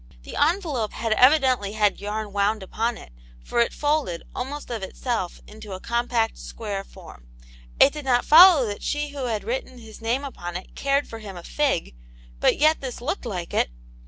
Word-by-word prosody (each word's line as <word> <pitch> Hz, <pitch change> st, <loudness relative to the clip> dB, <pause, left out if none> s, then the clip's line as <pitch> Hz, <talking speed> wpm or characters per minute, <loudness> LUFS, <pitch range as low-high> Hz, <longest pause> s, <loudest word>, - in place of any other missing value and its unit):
The -, -, -9 dB
envelope 300 Hz, -, 0 dB
had 225 Hz, -1 st, 0 dB
evidently 255 Hz, -5 st, +4 dB
had 210 Hz, -2 st, +1 dB
yarn 210 Hz, 0 st, -4 dB
wound 205 Hz, +1 st, +1 dB
upon 230 Hz, +5 st, -2 dB
it, -, -, -13 dB, 0.3 s
for -, -, -2 dB
it 235 Hz, -, +3 dB
folded, 290 Hz, -, -1 dB
almost 275 Hz, +2 st, -5 dB
of 230 Hz, -3 st, -3 dB
itself, 190 Hz, 0 st, -3 dB
into 215 Hz, -2 st, -10 dB
a 185 Hz, -, -6 dB
compact, 235 Hz, 0 st, -1 dB
square 205 Hz, -3 st, -5 dB
form; -, -, -14 dB, 0.5 s
it 275 Hz, -, +7 dB
did 300 Hz, -2 st, -7 dB
not 245 Hz, -2 st, +2 dB
follow 330 Hz, -3 st, +8 dB
that 205 Hz, -2 st, -5 dB
she* 295 Hz, 0 st, -2 dB
who 280 Hz, -2 st, -5 dB
had 225 Hz, -3 st, -2 dB
written 475 Hz, -, -4 dB
his 225 Hz, -2 st, -12 dB
name 240 Hz, +5 st, 0 dB
upon 175 Hz, -11 st, -5 dB
it 185 Hz, -, -12 dB
cared 280 Hz, +1 st, 0 dB
for 225 Hz, -, -8 dB
him 200 Hz, -4 st, -9 dB
a 175 Hz, -, -9 dB
fig; 275 Hz, -, -1 dB, 0.5 s
but -, -, +3 dB
yet 310 Hz, +2 st, +3 dB
this 260 Hz, -3 st, -5 dB
looked 260 Hz, +2 st, -3 dB
like 180 Hz, -6 st, -5 dB
it. -, -, +2 dB
235 Hz, 190 wpm, -24 LUFS, 205-280 Hz, 0.5 s, follow